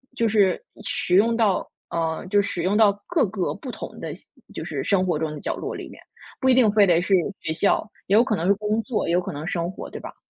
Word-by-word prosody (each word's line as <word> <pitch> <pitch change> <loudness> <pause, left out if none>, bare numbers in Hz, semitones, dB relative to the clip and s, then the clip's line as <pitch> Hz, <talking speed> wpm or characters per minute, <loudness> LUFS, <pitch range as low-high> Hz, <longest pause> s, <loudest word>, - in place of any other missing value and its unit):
就 235 -3 +1
是 205 - +2 0.2
使 180 - 0
用 230 +4 +4
到 210 -5 +1 0.2
呃， 165 0 -2
就 205 +2 +3
使 180 -4 -3
用 195 +4 +2
到 215 -2 +5
各 335 -10 +2
个 190 -1 -2
不 265 - -8
同 - - -8
的 - - -5 0.4
就 - - -5
是 - - -4
生 190 -2 +2
活 170 -4 0
中 155 -1 -2
的 150 - -7
角 - - -2
落 - - -4
里 - - -7
面， - - -13 0.4
不 260 - 0
一 260 - +7
定 245 -5 +5
非 205 -2 +5
得 170 -1 +4
是 190 +2 0 0.3
学 160 - -2
校， 200 +5 +2 0.2
也 195 - +1
有 230 - +7
可 215 -6 0
能 170 +3 -1
是 200 - +6
工 210 +2 -1
作， 245 -5 -1
也 170 - 0
有 175 - +4
可 180 - -5
能 145 +2 -6
是 - - -3
生 170 0 -1
活， 185 - -8
对 - - -8
吧？ - - -9
200 Hz, 285 characters per minute, -24 LUFS, 175-220 Hz, 0.4 s, 一